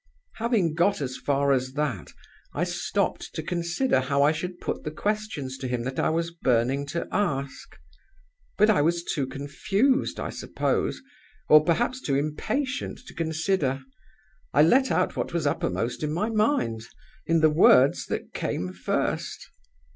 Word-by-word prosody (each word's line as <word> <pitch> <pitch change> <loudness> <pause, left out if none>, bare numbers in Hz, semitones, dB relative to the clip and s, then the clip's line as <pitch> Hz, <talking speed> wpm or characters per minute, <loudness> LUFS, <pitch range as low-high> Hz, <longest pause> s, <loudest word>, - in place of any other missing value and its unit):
"Having 220 -8 +1
got 175 +5 +2
as 130 -3 -3
far 140 0 +1
as 130 0 -1
that, 140 - -2 0.4
I - - 0
stopped - - -2
to - - -3
consider 175 - 0
how 140 +2 +1
I 145 - +5
should 175 +3 -5
put - - -4
the 155 - -3
questions 155 -7 -3
to 130 - -4
him 125 -1 -2
that 130 +2 -4
I - - +2
was 165 +1 -1
burning 135 -3 +1
to 170 +4 -3
ask. 140 - -2 0.8
But 210 +1 +5
I 195 - +3
was 170 +3 +1
too 140 -5 -2
confused, 195 - 0
I - - -3
suppose, - - -2 0.5
or 155 0 +8
perhaps 240 +10 0
too 140 - 0
impatient 255 - -2
to - - -11
consider. 160 -4 -1 0.7
I 145 - +7
let 260 - +4
out 180 - +1
what - - -3
was 170 -3 -1
uppermost 115 -4 -1
in 150 -1 -1
my 205 +8 -1
mind, 210 - +1 0.5
in 165 -1 +3
the 155 -1 +5
words 140 -4 +5
that - - -4
came 90 +1 -3
first. 90 - -2
155 Hz, 155 wpm, -26 LUFS, 135-185 Hz, 0.8 s, or